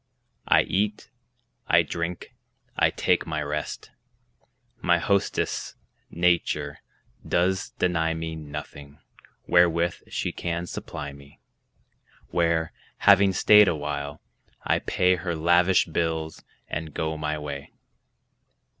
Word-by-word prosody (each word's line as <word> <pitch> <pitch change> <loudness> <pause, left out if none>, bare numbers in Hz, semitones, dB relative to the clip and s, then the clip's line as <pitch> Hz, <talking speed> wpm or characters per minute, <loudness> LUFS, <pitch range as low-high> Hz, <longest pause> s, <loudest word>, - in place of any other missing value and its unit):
I - - +5
eat; 105 +2 -2 0.6
I - - +5
drink; 85 +1 -5 0.4
I - - +4
take - - 0
my 75 -1 -2
rest. 75 0 -5 0.9
My 85 - +3
hostess, 100 +3 -1 0.3
nature, 80 -4 0 0.4
does 95 +2 0
deny 80 -2 +1
me 80 0 -4
Nothing, 75 -1 -9 0.5
wherewith 85 0 +3
she - - -3
can 85 0 -3
supply 70 -4 -6
me; 70 0 -16 0.9
Where, 85 -1 +1 0.3
having 100 -1 +7
stayed 105 +3 +6
a 85 - +2
while, 75 -1 -5 0.4
I - - +1
pay 90 0 +2
Her 85 0 -3
lavish 85 +3 +4
bills, 80 -1 -2 0.2
and 80 -1 -5
go 80 0 -2
my 75 0 -2
way. 70 -2 -7
80 Hz, 110 wpm, -25 LUFS, 75-90 Hz, 0.9 s, having